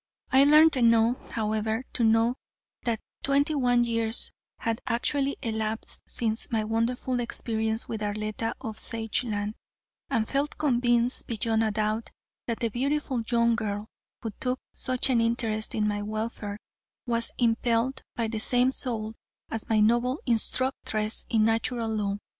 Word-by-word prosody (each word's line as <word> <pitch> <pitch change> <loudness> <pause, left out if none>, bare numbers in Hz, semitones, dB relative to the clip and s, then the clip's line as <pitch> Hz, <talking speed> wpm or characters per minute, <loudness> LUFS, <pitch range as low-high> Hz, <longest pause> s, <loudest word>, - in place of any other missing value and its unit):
I 270 +1 +7
learned 305 +2 +7
enough, 230 0 +3
however, 220 +1 -1
to 240 - 0
know 225 +2 +4 0.5
that 230 -2 0 0.2
twenty 280 +2 +2
one 245 -4 +3
years 230 -1 +1 0.3
had 230 -1 -2
actually 275 +4 0
elapsed 220 -1 -1
since 225 -1 +1
my 220 -2 +1
wonderful 235 +3 -1
experience 220 -1 -1
with 220 -2 -4
Arletta 215 +2 -2
of 220 -1 -5
Sageland, 220 -2 -1 0.6
and 220 -1 +1
felt 280 +2 -1
convinced 240 -3 +1
beyond 225 -1 +1
a 220 - +2
doubt 215 +1 -1 0.4
that 230 +1 -3
the 230 - +1
beautiful 270 +1 -1
young 235 -1 +3
girl, 210 -2 -3 0.3
who 225 - -3
took 255 0 -1
such 255 +1 0
an 235 -2 +3
interest 230 -2 0
in 210 -1 +1
my 205 0 -1
welfare, 215 -1 -4 0.5
was 230 -1 +1
impelled 235 +2 +1
by 230 -2 0
the 220 0 -3
same 250 +3 +3
soul 225 -5 -2 0.4
as 225 - -1
my 220 -1 +3
noble 240 +6 +3
instructress 230 -2 -1
in 220 -2 +3
Natural 230 +1 0
Law. 205 -2 -1
230 Hz, 140 wpm, -27 LUFS, 220-245 Hz, 0.6 s, I